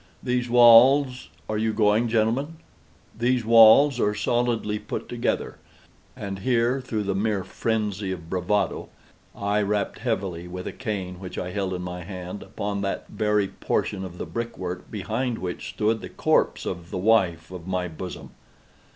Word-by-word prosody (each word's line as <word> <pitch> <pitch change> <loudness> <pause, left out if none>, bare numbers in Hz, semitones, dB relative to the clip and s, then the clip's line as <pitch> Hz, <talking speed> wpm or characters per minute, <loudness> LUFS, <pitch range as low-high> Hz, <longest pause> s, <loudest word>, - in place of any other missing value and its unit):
These 125 -1 -1
walls—are 125 -1 +5
you 110 0 0
going, 105 +2 +3
gentlemen?—these 120 0 -2
walls 115 +4 +7
are 105 -1 +1
solidly 115 -1 0
put - - -5
together;" - - -2 0.6
and 100 -1 -5
here, 120 +4 +1
through 110 -4 -3
the 100 -1 -1
mere 100 0 0
phrenzy 105 -4 -2
of 85 -3 -6
bravado, 95 +4 -1 0.5
I 100 +1 0
rapped 105 0 -1
heavily, 90 -3 -2
with 90 +1 -7
a - - -3
cane 95 -6 -4
which 95 -1 -8
I 90 - -3
held 95 -1 -2
in 90 - -5
my 90 0 -5
hand, 90 +1 -7
upon 100 0 -4
that 100 0 -3
very 105 -2 +1
portion 95 -2 -2
of 90 -2 -8
the - - -4
brick 115 0 -5
work 90 -1 -5
behind 110 +4 -2
which 90 -1 -5
stood 110 +1 0
the - - -7
corpse - - +1
of 85 -2 -5
the - - -4
wife 90 -5 +2
of 90 -1 -8
my 90 -1 -1
bosom. 90 +2 -8
105 Hz, 155 wpm, -25 LUFS, 95-115 Hz, 0.6 s, walls